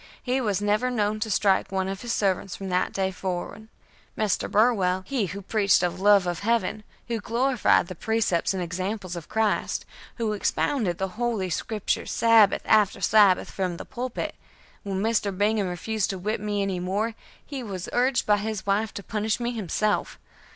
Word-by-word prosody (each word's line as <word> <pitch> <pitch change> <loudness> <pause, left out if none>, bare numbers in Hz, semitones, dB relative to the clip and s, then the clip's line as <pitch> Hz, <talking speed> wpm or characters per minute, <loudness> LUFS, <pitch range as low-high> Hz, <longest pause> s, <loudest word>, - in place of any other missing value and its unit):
He 255 +1 0
was 205 -4 0
never 210 +5 +2
known 215 -3 0
to 220 +1 -2
strike 195 -1 +2
one 190 -1 -1
of 195 0 -4
his 240 - -4
servants 195 -2 0
from 195 -1 -6
that 180 0 +1
day 190 -1 -1
forward. 185 +3 -5 0.5
Mr. 210 -4 0
Burwell, 195 -5 +2
he 250 -8 -1
who 200 +3 -7
preached 200 0 +3
the 180 -1 +1
love 195 +2 +4
of 175 -1 -2
Heaven, 220 -1 0 0.2
who 230 -1 -2
glorified 245 -1 +2
the 185 - -7
precepts 215 -2 0
and 190 -2 -2
examples 185 +2 -4
of 170 -3 -8
Christ, 220 -1 0 0.3
who 225 -3 -1
expounded 205 -2 0
the 190 +3 -4
Holy 220 -7 0
Scriptures 215 +3 -2
Sabbath 225 -3 +4
after 210 -2 +3
Sabbath 200 -1 +4
from 180 -3 -2
the - - -8
pulpit, 250 -1 -4 0.5
when 195 -1 -3
Mr. 210 -4 0
Bingham 205 0 +2
refused 205 +4 -2
to 195 - -3
whip 210 +3 -2
me 205 -1 -1
any 190 -2 -2
more, 200 +6 -1 0.4
was 210 -10 -5
urged 250 +1 +2
by 210 -1 +4
his 215 -1 -4
wife 200 +2 +1
to 200 - -6
punish 215 +3 -1
me 240 0 -1
himself. 215 -1 -1
205 Hz, 175 wpm, -25 LUFS, 190-220 Hz, 0.5 s, love